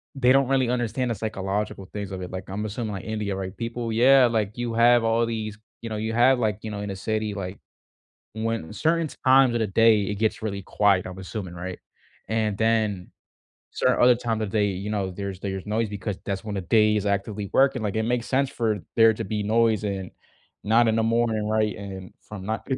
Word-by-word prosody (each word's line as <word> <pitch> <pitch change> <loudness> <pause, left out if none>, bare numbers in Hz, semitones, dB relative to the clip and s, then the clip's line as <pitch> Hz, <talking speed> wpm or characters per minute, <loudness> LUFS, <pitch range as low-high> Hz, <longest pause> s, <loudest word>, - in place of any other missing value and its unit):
they 130 -2 +3
don't 135 0 +4
really 130 -2 +2
understand 125 0 -1
the - - -1
psychological 100 -1 -3
things 100 -2 -5
of 95 -1 -5
it. 90 - -6
Like, 95 0 -6
I'm 105 +3 -3
assuming 110 0 -4
like 95 - -6
India, 105 -3 -3
right, 95 0 -5
people 115 -1 -4
yeah, 130 +3 +6
like, 110 -2 0
you 120 -1 -2
have 120 +1 +5
all 115 +1 +2
these 110 -2 -4 0.2
you 115 - -6
know, 110 - -3
you 110 +1 -2
have, 125 +2 +4
like, 105 -4 0
you 110 - -5
know, 105 - -5
in 105 - -4
a 100 - -4
city, 110 +1 -2
like, 95 -1 -6 0.7
when 110 -6 -3
certain 165 +1 +1 0.2
times 130 -2 +6
of 120 - 0
the 110 - 0
day 110 +1 +4
it 105 +2 -3
gets 110 +2 -1
really 100 -3 -4
quiet, 100 -1 +2
I'm 90 +1 -8
assuming, 95 -2 -6
right? 90 +1 -6 0.5
And 110 -2 0
then 110 -4 0 0.6
certain - - +1
other 125 0 +7
times 115 -2 -2
of 110 - -2
day, 105 +1 +1
you 100 +1 -4
know, 100 -3 -1
there's 100 0 -6
there's 95 -1 -4
noise 110 +2 0
because 100 -1 -4
that's 100 +1 -3
when 105 -1 -5
the 95 - -2
day 105 +3 +3
is 105 - -2
actively 100 0 -2
working. 135 -2 +3
Like, 105 -1 -2
it 110 - +1
makes 120 +1 -1
sense 135 0 +1
for 110 -6 -1 0.2
there 115 0 +7
to 115 - -5
be 105 +1 -3
noise 110 0 +2
and 95 -2 -4 0.5
not 115 +3 +4
in 110 - +1
the 115 - +2
morning, 115 -2 +1
right? 110 -1 +1
And 95 -2 -8
from 100 -3 -9
ni 115 +4 -2
110 Hz, 220 wpm, -25 LUFS, 100-115 Hz, 0.7 s, other